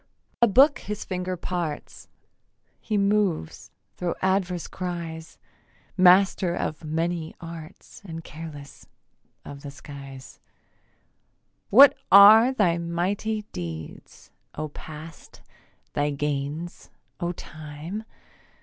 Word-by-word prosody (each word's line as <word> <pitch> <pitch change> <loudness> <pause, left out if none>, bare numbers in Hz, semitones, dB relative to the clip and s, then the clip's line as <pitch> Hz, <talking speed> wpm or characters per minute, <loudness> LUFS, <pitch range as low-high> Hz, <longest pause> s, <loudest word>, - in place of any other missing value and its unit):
A 235 - +7
book 270 +8 +5
his 210 0 -6
finger 180 -1 -3
parts; 170 -4 -5 0.7
He 215 -2 -2
moves 200 - 0 0.3
thro' 175 -1 -2
adverse 190 -2 0
cries; 170 -3 -6 0.6
Master 185 -1 +5
of 155 - -4
many 165 +1 -2
arts 165 -2 -11
And 165 -4 -8
careless 150 -3 -10 0.6
of 140 0 -9
the 145 - -7
skies. 140 -2 -11 1.3
What 270 +6 +8 0.2
are 215 +5 +9
thy 180 -9 +1
mighty 190 +6 -2
deeds, 80 -3 -8 0.2
O 155 0 -4
Past, 155 +2 -11 0.5
thy 145 0 0
gains, 145 +3 -4 0.3
O 175 -1 -1
Time? 155 +5 -8
170 Hz, 95 wpm, -25 LUFS, 150-190 Hz, 1.3 s, are